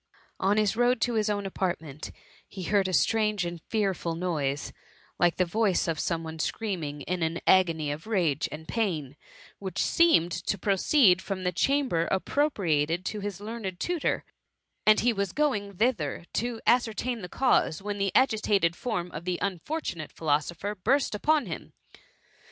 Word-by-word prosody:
On 200 +2 +2
his 215 -1 +2
road 245 +1 +3
to 245 - +1
his 215 -1 +1
own 205 -1 -1
apartment, 165 -6 -3 0.4
he 190 - -8
heard 200 +1 +2
a - - -2
strange 210 +3 +2
and 170 -1 -5
fearful 195 -6 -1
noise, 150 -5 -2 0.5
like 175 -1 +3
the 185 - +2
voice 195 0 +1
of 160 -2 -1
some 165 -1 -1
one 160 0 -7
screaming 160 -7 -3
in 180 +4 -3
an 165 +1 -1
agony 165 -5 +3
of 155 +6 -6
rage 170 -10 +1
and 160 +1 -8
pain, 160 - -2 0.4
which 190 -3 -6
seemed 325 - +4
to 170 +4 -2
proceed 195 0 +4
from 190 -1 -4
the 180 - +1
chamber 255 - +1
appropriated 185 - 0
to 210 - -3
his 200 -2 -5
learned 205 -4 -5
tutor; 350 -3 -1 0.6
and 215 0 +6
he 240 0 +3
was 200 -3 -2
going 205 -11 0
thither 175 - 0
to 235 0 -2
ascertain 240 0 +1
the 180 - -7
cause, 255 -11 +2
when 205 +1 -4
the 195 -1 +1
agitated 210 -8 +3
fdrm 180 -4 -3
of 155 +2 -7
the 180 0 -1
unfortunate 185 - -3
phi 165 - -11
losopher 165 +7 0
burst 275 -2 +2
upon 295 +6 +2
him. 170 -5 -7
190 Hz, 165 wpm, -28 LUFS, 170-220 Hz, 0.6 s, and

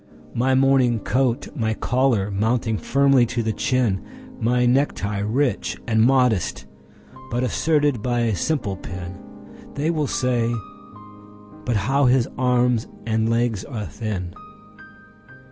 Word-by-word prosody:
My 130 +2 +2
morning 130 -3 +3
coat, 125 +4 0
my 110 -5 -1
collar 120 -6 +1
mounting 110 +3 0
firmly 140 -2 +3
to 120 0 -2
the 110 0 -1
chin, 120 -6 0 0.4
My 125 +2 +2
necktie 120 -6 +1
rich 120 +7 -1
and 110 -2 +2
modest, 120 - +2 0.6
but 120 +2 -1
asserted 145 -2 +1
by 120 0 0
a 115 -3 +1
simple 110 - -1
pin—(They 95 - -7
will 155 -3 -1
say: 120 -3 0 1.1
"But 120 - 0
how 135 +7 +2
his 125 -1 +3
arms 125 -2 +1 0.2
and 110 0 0
legs 115 -4 0
are 110 -6 -5
thin!") 95 -3 -5
120 Hz, 120 wpm, -22 LUFS, 110-130 Hz, 1.1 s, morning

